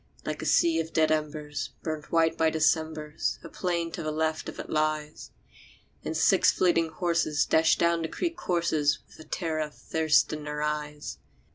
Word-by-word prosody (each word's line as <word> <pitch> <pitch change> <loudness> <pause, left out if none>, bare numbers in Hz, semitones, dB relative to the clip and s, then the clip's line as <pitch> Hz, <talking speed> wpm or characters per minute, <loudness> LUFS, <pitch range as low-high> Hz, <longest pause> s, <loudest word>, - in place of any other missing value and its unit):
Like - - -3
a - - -3
sea 165 -1 +4
of 165 0 -4
dead 155 -1 +3
embers, 150 -2 -2
burnt 155 -2 -5
white 165 -1 +3
by 160 0 +3
Decembers, 155 -1 0
A - - -8
plain 170 -2 -2
to 170 - -5
the 155 - -2
left 160 0 -1
of - - -9
it - - -6
lies; 155 -1 -2 0.7
And - - -3
six - - +5
fleeting 165 -3 +2
horses 165 -2 +1
dash 160 0 +4
down 170 0 +2
the 160 - -1
creek 335 - -3
courses 165 - +1
With - - -19
the 160 - -12
terror 160 0 -2
of 150 -1 -3
thirst 160 -1 +2
in 150 -1 -5
their 150 0 -3
eyes. 150 -1 -4
160 Hz, 180 wpm, -28 LUFS, 150-165 Hz, 0.7 s, six